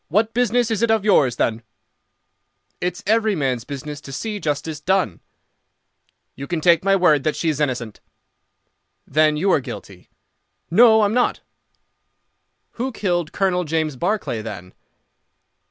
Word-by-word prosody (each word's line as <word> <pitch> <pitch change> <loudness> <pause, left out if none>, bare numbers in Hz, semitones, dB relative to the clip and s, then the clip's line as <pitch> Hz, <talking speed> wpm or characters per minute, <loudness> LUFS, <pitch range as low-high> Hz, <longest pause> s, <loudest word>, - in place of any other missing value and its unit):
"What 215 +6 +1
business 245 -1 +1
is 220 -1 -1
it 235 - +2
of 220 -2 +2
yours, 140 - +3
then?" 115 -1 -1 1.2
"It's 180 +2 -3
every 220 0 +2
man's 130 -6 -1
business 145 +1 -7
to 135 - -10
see 210 +9 -4
justice 150 -1 -3
done." 180 - 0 1.1
"You 140 +1 -8
can 175 -2 -2
take 170 +1 +4
my 195 0 +3
word 155 -7 +3
that 155 - 0
she 165 - -1
is 150 -2 -2
innocent." 125 -7 -2 1.1
"Then 155 +1 +2
you 190 +5 +1
are - - +4
guilty." 130 - -10 0.6
"No, 220 +3 +6
I - - +4
am 205 - 0
not." 245 0 +1 1.4
"Who 260 +1 -1
killed 175 -7 -2
Colonel 185 -2 0
James 155 -2 -1
Barclay, 175 - -2
then?" 95 -5 -8
170 Hz, 145 wpm, -21 LUFS, 145-210 Hz, 1.4 s, No